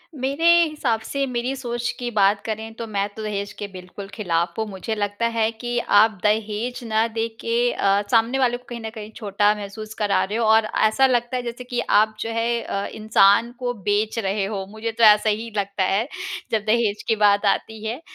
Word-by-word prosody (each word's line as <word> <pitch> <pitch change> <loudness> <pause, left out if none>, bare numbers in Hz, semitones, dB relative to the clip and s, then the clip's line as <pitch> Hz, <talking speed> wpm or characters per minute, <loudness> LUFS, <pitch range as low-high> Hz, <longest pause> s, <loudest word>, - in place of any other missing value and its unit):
मेरे 275 +4 -2 0.2
हिसाब 290 -8 -1
से 275 +5 -2
मेरी 250 +1 -2
सोच 240 -2 -3
की 245 -1 -3
बात 200 -1 +3
करें 220 0 -4
तो 230 - -5
मैं 200 -1 -1
तो 220 - -6
दहेज 200 -1 -3
के 205 - -6
बिल्कुल 185 +2 -9
खिलाफ 170 -5 -1
हूँ, 220 - 0
मुझे 200 +3 -4
लगता 205 +2 -2
है 225 -1 +1
कि 240 +2 -4
आप 220 -1 +4
दहेज 215 +3 0
ना 220 0 +1
दे 225 0 -2
के 240 +1 +1
अ, 200 +1 +2
सामने 235 +3 +3
वाले 245 -2 +2
को 250 - -22
कहीं 240 -1 -6
न 220 - -5
कहीं 215 0 -8
छोटा 205 -1 +1
महसूस 215 +1 -8
करा 205 -2 +2
रहे 210 +4 -3
हो 230 - +1
और 220 0 +5 0.2
ऐसा 265 +5 +3
लगता 240 0 0
है 245 - -3
जैसे 240 +1 -6
कि 245 0 -3
आप 215 +1 +4
जो 225 - -3
है 230 +1 0
अ, 200 - -3
इंसान 215 +1 +4
को 245 -1 -2
बेच 210 +1 -1
रहे 195 -1 -1
हो 195 -2 -4
मुझे 220 +2 -4
तो 230 +1 -1
ऐसा 210 0 +6
ही 220 +2 -2
लगता 200 -1 -1
है, 200 +6 +1 0.4
जब 220 -2 0
दहेज 215 -2 +1
की 225 - +3
बात 205 -1 +3
आती 220 +2 -1
है। 235 +7 -4
220 Hz, 210 wpm, -22 LUFS, 205-235 Hz, 0.4 s, ऐसा